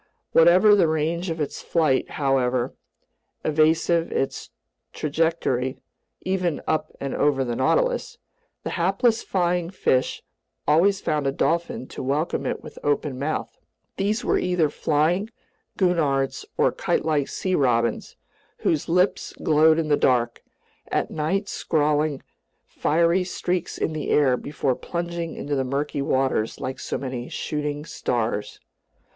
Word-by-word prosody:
Whatever 180 Hz, +6 st, +6 dB
the 195 Hz, -5 st, +5 dB
range 160 Hz, +3 st, -1 dB
of 165 Hz, 0 st, -3 dB
its 150 Hz, -, -3 dB
flight, 155 Hz, -6 st, +1 dB
however 130 Hz, -3 st, +1 dB, 0.7 s
evasive 160 Hz, +2 st, +2 dB
its 135 Hz, -, -2 dB, 0.4 s
trajectory 150 Hz, -4 st, 0 dB, 0.4 s
(even 180 Hz, -4 st, -1 dB
up 155 Hz, -, -1 dB
and 140 Hz, -1 st, -3 dB
over 140 Hz, -2 st, +2 dB
the 120 Hz, -1 st, -2 dB
Nautilus), -, -, +1 dB, 0.5 s
the -, -, -3 dB
hapless 195 Hz, +6 st, +2 dB
flying 175 Hz, -2 st, 0 dB
fish 130 Hz, -8 st, 0 dB, 0.4 s
always 190 Hz, +7 st, +4 dB
found 150 Hz, -2 st, 0 dB
a -, -, +2 dB
dolphin 165 Hz, -1 st, -1 dB
to -, -, -7 dB
welcome 145 Hz, +5 st, -1 dB
it -, -, -3 dB
with -, -, -10 dB
open 145 Hz, -2 st, 0 dB
mouth. 150 Hz, +3 st, -3 dB, 0.4 s
These 210 Hz, +4 st, 0 dB
were -, -, +2 dB
either 180 Hz, -4 st, +1 dB
flying 170 Hz, +8 st, +1 dB, 0.5 s
gurnards 150 Hz, -8 st, +1 dB
or -, -, +3 dB
kitelike 150 Hz, -3 st, 0 dB
sea 185 Hz, -, -2 dB
robins, 120 Hz, -7 st, +1 dB, 0.5 s
whose 155 Hz, -1 st, 0 dB
lips 180 Hz, +3 st, +1 dB
glowed 155 Hz, 0 st, +5 dB
in 165 Hz, -1 st, 0 dB
the 145 Hz, -, +4 dB
dark, 120 Hz, -2 st, +1 dB, 0.5 s
at -, -, -1 dB
night 185 Hz, +7 st, -1 dB
scrawling 150 Hz, -4 st, 0 dB, 0.4 s
fiery 170 Hz, +4 st, +2 dB
streaks 180 Hz, -1 st, -2 dB
in 160 Hz, -, -1 dB
the 155 Hz, -, -4 dB
air 135 Hz, -4 st, +4 dB
before 140 Hz, 0 st, -1 dB
plunging 170 Hz, +3 st, -4 dB
into 145 Hz, 0 st, -3 dB
the 135 Hz, -, +1 dB
murky 140 Hz, +2 st, -2 dB
waters 130 Hz, -5 st, 0 dB
like 130 Hz, 0 st, -4 dB
so -, -, -3 dB
many 130 Hz, -2 st, -5 dB
shooting 150 Hz, 0 st, -3 dB
stars. 110 Hz, -8 st, -2 dB
155 Hz, 130 wpm, -24 LUFS, 135-170 Hz, 0.7 s, Whatever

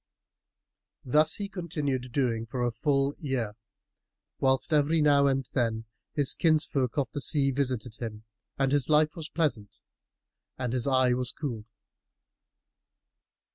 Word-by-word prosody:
Thus 155 Hz, +5 st, +3 dB
he 205 Hz, -, -4 dB
continued 150 Hz, -, -3 dB
doing 115 Hz, -4 st, 0 dB
for 125 Hz, +1 st, -3 dB
a 120 Hz, -, +1 dB
full 140 Hz, +4 st, +1 dB
year, 130 Hz, -8 st, -2 dB, 0.9 s
whilst, 135 Hz, +4 st, +1 dB
every 150 Hz, +2 st, +3 dB
now 145 Hz, -2 st, +4 dB
and 135 Hz, -2 st, 0 dB
then, 115 Hz, -3 st, 0 dB, 0.3 s
his 145 Hz, -3 st, +2 dB
kinsfolk 150 Hz, -6 st, +1 dB
of 140 Hz, -, 0 dB
the 145 Hz, -, -4 dB
sea 140 Hz, -2 st, +3 dB
visited 125 Hz, -4 st, -2 dB
him, 110 Hz, -2 st, -6 dB, 0.3 s
and 135 Hz, -1 st, +1 dB
his 145 Hz, 0 st, +1 dB
life 150 Hz, 0 st, +3 dB
was 165 Hz, -2 st, -7 dB
pleasant 135 Hz, -11 st, -2 dB, 0.8 s
and 125 Hz, -2 st, -2 dB
his 125 Hz, -1 st, -1 dB
eye 130 Hz, -2 st, +4 dB
was 125 Hz, 0 st, 0 dB
cooled. 115 Hz, -8 st, -5 dB
135 Hz, 135 wpm, -28 LUFS, 125-150 Hz, 0.9 s, now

